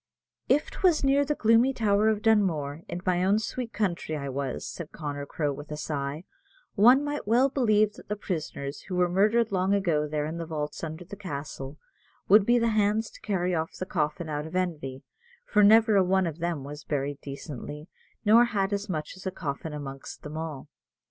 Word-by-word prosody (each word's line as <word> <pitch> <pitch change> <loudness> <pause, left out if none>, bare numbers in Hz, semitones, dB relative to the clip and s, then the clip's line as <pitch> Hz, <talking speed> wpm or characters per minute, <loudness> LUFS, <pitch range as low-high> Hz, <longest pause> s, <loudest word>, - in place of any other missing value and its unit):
"If 295 - +2
'twas 355 -6 +2
near 275 +1 +4
the 295 +1 -1
gloomy 230 +3 +4
tower 215 -1 +3
of 215 -1 -1
Dunmore, 165 -9 +2
in 175 - -4
my 180 -1 +2
own 195 +3 +3
sweet 230 +2 -4
country, 175 -7 -2
I 140 -1 -4
was," 135 0 -3
said 170 -3 -7
Connor 145 -2 -5
Crowe, 145 -2 -1
with 145 +2 -9
a 150 - -5
sigh, 145 0 -3 0.5
"one 245 +7 +6
might 290 -5 -4
well 245 +5 +4
believe 215 -6 +2
that - - -14
the 210 - 0
prisoners, 155 -7 -4
who 185 - -3
were 180 0 +3
murdered 210 +5 +2
long 190 +1 +2
ago 165 -7 +1
there 150 0 -2
in 160 +2 -4
the 165 - -5
vaults 150 -1 -4
under 160 +2 -5
the 200 - -9
castle, 145 -6 -6 0.5
would 205 +1 +6
be 240 +1 +5
the 230 -1 +2
hands 215 0 +1
to - - -15
carry 185 -3 -1
off 160 -1 -2
the 185 - -4
coffin 160 -2 -2
out 150 0 -3
of 160 - -9
envy, 155 -8 -2 0.4
for 210 - +3
never 220 +1 +6
a 190 - +5
one 190 +1 +2
of 165 -1 -4
them 170 -4 -2
was 145 +1 -8
buried 145 -1 -3
decently, 145 +2 -7 0.4
nor 225 +3 +7
had 200 -3 -1
as 200 +1 -3
much 155 -2 -3
as 190 0 -8
a - - -1
coffin 155 -2 -5
amongst 135 -2 -8
them 150 +1 -7
all. 160 -3 -5
180 Hz, 200 wpm, -27 LUFS, 150-210 Hz, 0.5 s, nor